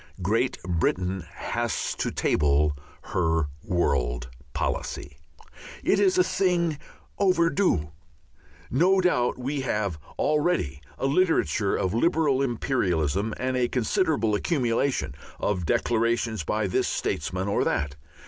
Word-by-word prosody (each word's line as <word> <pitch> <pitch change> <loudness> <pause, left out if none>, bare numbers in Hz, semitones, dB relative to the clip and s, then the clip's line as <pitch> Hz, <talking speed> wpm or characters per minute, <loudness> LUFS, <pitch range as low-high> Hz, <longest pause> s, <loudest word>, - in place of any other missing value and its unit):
Great 115 +7 +1
Britain 90 +2 -1
has - - -2
to - - -2
table 75 0 +2 0.4
her 80 -3 +1
world 65 - 0 0.2
policy. 70 +3 -3 0.7
It - - +3
is 195 -2 +3
a 180 - +6
thing 175 -4 +1 0.4
overdue. 170 - +2 0.8
No 180 +9 +4
doubt 125 -10 +2
we 135 +3 -2
have 105 -9 -1 0.2
already 150 - +1 0.2
a - - -2
literature 135 - +2
of 95 +1 -1
liberal 145 +1 +2
imperialism 105 - 0
and 130 0 -1
a 125 -1 +2
considerable 130 - +1
accumulation 120 - 0 0.3
of 90 -5 -1
declarations 115 -3 +1
by 105 +5 0
this 95 - +1
statesman 95 +2 -2
or 100 - +1
that. 70 -1 -1
115 Hz, 110 wpm, -26 LUFS, -, 0.8 s, a